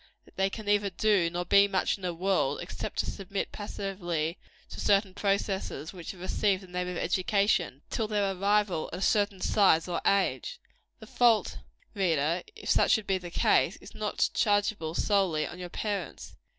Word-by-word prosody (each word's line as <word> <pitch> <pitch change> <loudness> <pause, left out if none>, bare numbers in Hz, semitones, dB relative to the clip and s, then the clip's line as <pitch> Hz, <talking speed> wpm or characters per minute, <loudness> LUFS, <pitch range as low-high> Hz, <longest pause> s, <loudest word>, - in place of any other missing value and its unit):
that - - -22
they 195 0 +1
can 215 +2 -7
neither 205 0 +2
do 195 -2 +2
nor 175 +1 -3
be 200 +1 +6
much 190 -2 0
in 195 - -15
the 180 -1 -2
world, 190 +3 0
except - - -6
to - - +1
submit 195 0 -4
passively 180 -5 -3 0.3
to - - -9
certain 200 -1 +2
processes 195 -4 -2
which 175 -3 -9
have 185 - -7
received 190 +1 0
the - - -12
name 180 0 -3
of 180 -1 -4
education, 185 -5 +1
till 220 - -1
their 205 -2 0
arrival 200 -3 +1
at - - -3
a - - -7
certain 205 -2 +2
size 185 -4 +3
or 175 -2 -2
age. 200 - +1 0.4
The - - -11
fault, 235 -3 +2 0.3
reader 170 -4 +1
if 445 - -10
such - - +3
should 220 -3 +1
be 190 -1 0
the 175 -1 -8
case - - +2
is - - -14
not - - -1
chargeable, 205 -6 +1
solely, 190 -7 +1
on 175 - -8
your 180 -1 -6
parents. 205 +2 -4
195 Hz, 180 wpm, -29 LUFS, 175-205 Hz, 0.4 s, be